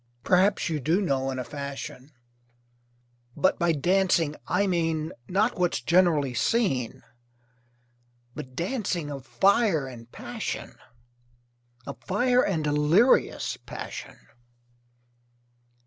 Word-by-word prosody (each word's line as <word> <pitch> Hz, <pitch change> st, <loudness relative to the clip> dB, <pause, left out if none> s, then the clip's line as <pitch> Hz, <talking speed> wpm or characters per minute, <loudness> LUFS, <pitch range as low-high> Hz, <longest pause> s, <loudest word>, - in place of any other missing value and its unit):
Perhaps, 190 Hz, -, +3 dB
you 160 Hz, -3 st, -1 dB
do 160 Hz, +8 st, +1 dB
know, 135 Hz, -8 st, 0 dB
in 130 Hz, -, -3 dB
a 125 Hz, -, -2 dB
fashion; 140 Hz, 0 st, -7 dB, 1.3 s
But 190 Hz, -, +2 dB
by 170 Hz, 0 st, +3 dB
dancing 170 Hz, 0 st, +2 dB
I 200 Hz, +3 st, +2 dB
mean, 165 Hz, -4 st, 0 dB, 0.2 s
Not 210 Hz, +3 st, +1 dB
what's 180 Hz, -1 st, +1 dB
generally 165 Hz, -7 st, +3 dB
seen, 130 Hz, -, 0 dB, 1.3 s
But 130 Hz, 0 st, -9 dB
dancing 175 Hz, -, -2 dB
of 135 Hz, -2 st, -8 dB
fire 195 Hz, -, +3 dB
and 120 Hz, -2 st, -11 dB
passion, -, -, -5 dB, 1.1 s
Of 140 Hz, -, -7 dB
fire 245 Hz, +6 st, +2 dB
and 165 Hz, -6 st, -1 dB
delirious 150 Hz, -, +3 dB
passion. -, -, -8 dB
165 Hz, 100 wpm, -26 LUFS, 140-190 Hz, 1.3 s, Perhaps